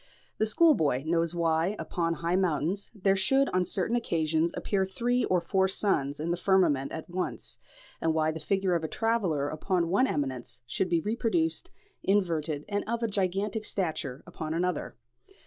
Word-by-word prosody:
The 220 - +3
schoolboy 210 - +4
knows 165 +1 +1
why, 165 +3 +1
upon 165 -1 -1
high 170 +2 -1
mountains, 185 +1 0
there 195 -1 +2
should 270 +9 +3
on 185 0 +1
certain 190 +5 0
occasions 165 -7 +1
appear 195 -2 0
three 245 +6 0
or 185 - +2
four 190 +3 +1
suns 150 -8 0
in 165 +3 -1
the 175 - 0
firmament 170 -8 +2
at 160 - -6
once, 180 +1 -4 0.4
and 165 - +2
why 160 0 +1
the 160 - -6
figure 190 +3 0
of 170 -2 0
a - - -1
traveller 190 -10 0
upon 170 +3 -1
one 255 +9 +3
eminence 130 - -3
should 180 +9 -1
be 170 -2 +2
reproduced, 240 - 0 0.3
inverted 165 -7 0
and 205 0 -1
of 235 +1 -1
a - - +2
gigantic 200 +2 -1
stature, 160 -9 -3
upon 155 0 -5
another. 180 -1 -1
180 Hz, 165 wpm, -29 LUFS, 160-200 Hz, 0.4 s, schoolboy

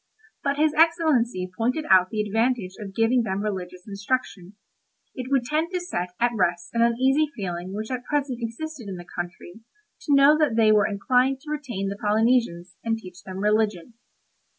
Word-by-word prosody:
But 280 0 0
his 305 0 +3
Excellency 305 - +2
pointed 250 +7 -1
out 185 -7 +5
the 215 -1 -1
advantage 225 -2 0
of 195 -2 -8
giving 230 +2 +3
them 200 -2 -2
religious 180 -3 -5
instruction. 205 -2 -3 0.6
It 255 -1 -6
would 270 -3 +2
tend 310 +6 -1
to 360 - 0
set 180 - -4
at 240 0 +2
rest 175 -3 0
an 230 - +1
uneasy 265 +6 +2
feeling 180 -2 -5
which 215 +4 -5
at 250 -1 -3
present 280 -4 -1
existed 235 +2 -6
in 190 - -5
the 175 0 -9
country 175 +3 -8 0.5
to 290 - +4
know 280 +2 +7
that 295 -7 +2
they 220 -1 +5
were 210 -1 +4
inclined 250 +6 +1
to 300 - -8
retain 250 -10 -3
the 200 - -5
Polynesians, 210 -5 +1
and 225 -1 0
teach 185 -4 -12
them 185 0 -8
religion." 210 -1 0
225 Hz, 175 wpm, -24 LUFS, 190-265 Hz, 0.6 s, know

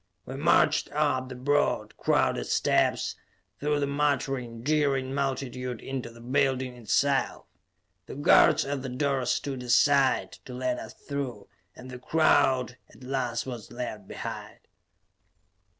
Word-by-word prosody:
We 130 - -7
marched 145 +5 +3
up 145 -4 0
the 130 - -7
broad, 145 +4 0
crowded - - +1
steps, - - +1 0.4
through 150 0 0
the 145 - +1
muttering, 135 -5 -1
jeering 140 -2 +1
multitude 130 -3 -3
into 130 -3 -5
the 115 0 -15
building 130 0 0
itself. 115 -5 0 0.6
The - - -8
guards 155 +2 +5
at 140 -1 -3
the 130 - -5
doors 135 -1 0
stood 135 -3 -2
aside 135 +2 +3
to 125 - -8
let 125 0 -1
us - - -9
through 135 -7 -6 0.3
and 125 0 -11
the 125 - -8
crowd 130 -4 +2
at - - -17
last 125 -3 -2
was 120 -5 -7
left 110 -5 -6
behind. - - -7
130 Hz, 135 wpm, -27 LUFS, 125-140 Hz, 0.6 s, guards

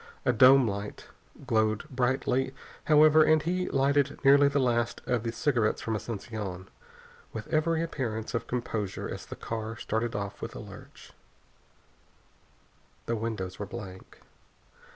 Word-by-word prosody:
A 125 - +3
dome 130 +2 +7
light 100 0 -5 0.4
glowed 110 -3 +1
brightly, 130 0 0 0.3
however, 155 0 +6
and 155 0 +5
he 180 +2 -1
lighted 140 +1 +2
nearly 140 +1 +7
the 140 0 0
last 120 -3 +1
of 125 -3 0
the 115 0 -3
cigarettes 120 -3 +1
from 115 - -3
Asunción 105 -4 -5 0.7
with 110 -1 -6
every 160 +1 +1
appearance 115 -9 -4
of 115 - -2
composure 110 -5 -3
as - - -7
the - - -7
car 110 0 -5
started 115 +2 -2
off 100 -1 -5
with - - -6
a - - -6
lurch. - - -12 1.9
The 115 - -1
windows 105 -5 -4
were 105 - -4
blank. 95 -4 -10
120 Hz, 135 wpm, -28 LUFS, 110-140 Hz, 1.9 s, dome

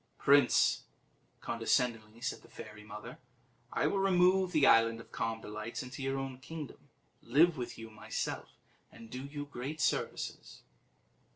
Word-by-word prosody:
"Prince," - - +5 0.6
condescendingly 115 -1 0
said 130 - -3
the - - -17
fairy 105 0 -10
mother, 105 +3 -9 0.5
"I - - +1
will 195 - +2
remove 185 -1 +4
the 155 -5 +4
Island 115 0 +5
of 115 - -13
Calm 115 0 -2
Delights 110 +3 -5
into 125 +2 -8
your 135 0 -1
own 135 -1 -4
kingdom, 150 0 -8 0.3
live 155 +8 +4
with 125 -2 -5
you 115 -1 -9
myself, 110 - -4 0.4
and 115 -1 -13
do 130 +1 -5
you 145 +1 -5
great 145 +2 -6
services." 140 - -2
125 Hz, 145 wpm, -33 LUFS, 115-145 Hz, 0.6 s, Prince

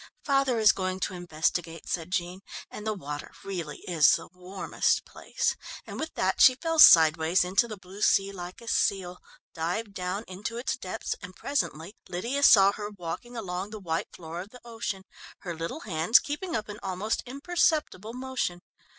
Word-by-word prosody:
"Father 275 -3 +2
is 220 -1 +7
going 185 -2 -3
to - - -1
investigate," 165 -1 -2
said 165 0 -3
Jean, 180 0 -2 0.3
"and 210 +1 -7
the 215 - +1
water 145 -5 -7
really 170 -7 -5
is 165 -5 +5
the - - -2
warmest 180 +2 -1
place," - - -2 0.3
and - - -7
with 315 +1 -4
that 190 0 +1
she 255 - +8
fell 325 +4 -2
sideways 160 - +8
into 195 +6 +2
the 215 -2 -7
blue 190 +2 -12
sea 195 -1 +3
like 180 0 -8
a 235 - -13
seal, 185 -5 0 0.3
dived 180 +6 -3
down 185 +3 -3
into 205 +5 -5
its 240 - -1
depths, 185 -7 -4
and 185 0 -10
presently 200 - -2 0.2
Lydia 235 +11 -2
saw 200 -8 +8
her 205 0 -6
walking 200 +5 -7
along 190 -2 -4
the 215 0 -8
white 165 -4 -2
floor 165 +1 -7
of 195 - -10
the 250 +2 -14
ocean, 225 -4 -4 0.4
her 175 - -5
little 165 - -5
hands 175 +2 +4
keeping 310 +5 -3
up 215 -1 -2
an 210 0 -8
almost 195 +3 -2
imperceptible 280 - 0
motion. 255 -9 -3
195 Hz, 175 wpm, -28 LUFS, 175-230 Hz, 0.4 s, she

